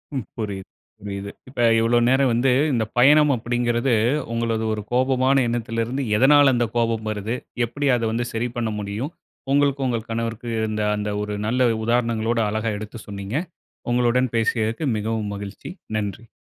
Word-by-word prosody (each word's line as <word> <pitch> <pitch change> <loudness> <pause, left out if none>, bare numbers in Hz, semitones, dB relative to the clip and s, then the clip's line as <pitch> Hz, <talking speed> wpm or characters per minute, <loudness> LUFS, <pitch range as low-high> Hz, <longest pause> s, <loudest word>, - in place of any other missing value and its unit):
ம், 130 -5 -2
புரியுது, 100 -3 -4 0.3
புரியுது. 100 0 -6 0.2
இப்ப 130 - -11 0.2
இவ்ளோ 115 +1 +3
நேரம் 130 0 +3
வந்து 125 +3 +2 0.2
இந்த 115 -2 +1
பயணம் 150 +4 +6
அப்பிடிங்குறது 120 +1 0 0.4
உங்களது 115 -1 -1
ஒரு 105 - -3
கோபமான 130 +1 +3
எண்ணத்துலருந்து, 115 +2 -2
எதனால 140 +2 +6
அந்த 120 -1 +1
கோபம் 115 -2 0
வருது? 110 +3 -3 0.3
எப்பிடி 140 +5 -2
அத 120 - -2
வந்து 120 +1 -1
சரி 115 +2 -1
பண்ண 115 -2 -1
முடியும்? 105 +10 -4 0.4
உங்களுக்கும் 140 -1 +2
உங்க 115 -2 0
கணவருக்கும் 115 +1 -3
இருந்த 110 -1 -1
அந்த 105 0 -3
ஒரு 105 - -4
நல்ல 125 +2 +3
உதாரணங்களோட, 115 0 +1
அழகா 110 +1 -1
எடுத்து 105 +2 -8
சொன்னீங்க. 100 +3 -6 0.6
உங்களுடன் 125 0 +2
பேசியதற்கு 115 +4 0
மிகவும் 110 -1 -2
மகிழ்ச்சி. 100 0 -8 0.3
நன்றி! 105 +2 -4
115 Hz, 145 wpm, -23 LUFS, 110-125 Hz, 0.6 s, பயணம்